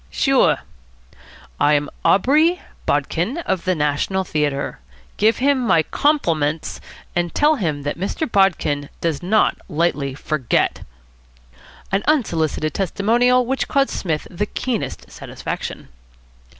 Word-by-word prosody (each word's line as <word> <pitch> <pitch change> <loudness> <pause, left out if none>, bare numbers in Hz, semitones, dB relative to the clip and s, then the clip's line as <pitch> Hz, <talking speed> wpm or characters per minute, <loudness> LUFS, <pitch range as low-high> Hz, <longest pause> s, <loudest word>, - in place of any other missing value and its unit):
"Sure." - - +3 1.0
"I 150 +1 +4
am 145 0 0 0.2
Aubrey 310 - +4 0.3
Bodkin, 265 +8 0
of 190 -2 -1
the 185 -1 +2
National 150 +6 0
Theatre. 150 -5 -2 0.4
Give 220 +2 +3
him 275 +1 +2
my 230 -10 +3
compliments, 165 - 0 0.3
and 175 -1 -1
tell 300 +1 +4
him 155 - -2
that 145 +3 -3
Mr. 195 - -2
Bodkin 160 -9 +1
does 160 -4 -1
not 210 +5 +2
lightly 150 -5 0
forget." 145 -3 0 1.1
An 195 +1 +2
unsolicited 165 - +1
testimonial 240 +6 +2
which 265 +2 -1
caused 275 -1 +1
Psmith 160 -5 -2
the 205 +4 -2
keenest 245 -1 -4
satisfaction. - - -6
185 Hz, 115 wpm, -20 LUFS, 150-245 Hz, 1.1 s, I